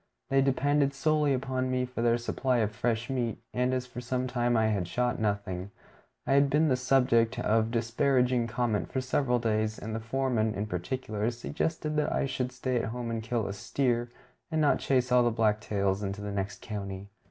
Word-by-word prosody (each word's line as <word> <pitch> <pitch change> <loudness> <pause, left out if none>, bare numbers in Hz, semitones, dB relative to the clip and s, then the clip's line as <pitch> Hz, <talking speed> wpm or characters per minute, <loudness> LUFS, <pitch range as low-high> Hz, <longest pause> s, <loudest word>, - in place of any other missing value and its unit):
They 135 0 +5
depended 140 +1 +2
solely 150 0 +2
upon 130 -1 -1
me 130 0 0
for 125 -2 -5
their 120 0 +3
supply 125 +2 0
of 110 -3 +1
fresh 115 +1 -1
meat; 125 -4 -1 0.2
and 125 +1 +1
as 130 -1 -1
for 125 -1 -8
some 125 +1 -1
time 120 -1 +1
I 110 - +3
had 100 -5 -1
shot 125 +5 0
nothing, 100 -3 -2 0.6
I - - +2
had 140 0 +5
been 155 +3 +3
the 130 - +3
subject 125 -3 +3
of 110 +1 +2
disparaging 125 +1 +1
comment 115 -2 -1
for 130 - -1
several 130 -1 +1
days, 110 -2 0
and 110 +1 -6
the 110 - -2
foreman, 115 -2 0
in 105 - -2
particular, 105 +3 -2
suggested 150 +5 -2
that 150 - +1
I - - +1
should 130 -1 -2
stay 130 0 -2
at 115 - 0
home 120 0 -4
and 115 -1 -2
kill 115 -1 -1
a 100 - -3
steer, 120 +3 -1 0.4
and 160 -1 0
not 150 -2 +3
chase 130 -2 +1
all 125 0 +6
the 120 - +3
black 110 -2 +2
tails 100 -2 0
into 100 0 -3
the 105 0 -4
next 100 0 -4
county. 100 -2 -6
120 Hz, 200 wpm, -29 LUFS, 110-130 Hz, 0.6 s, all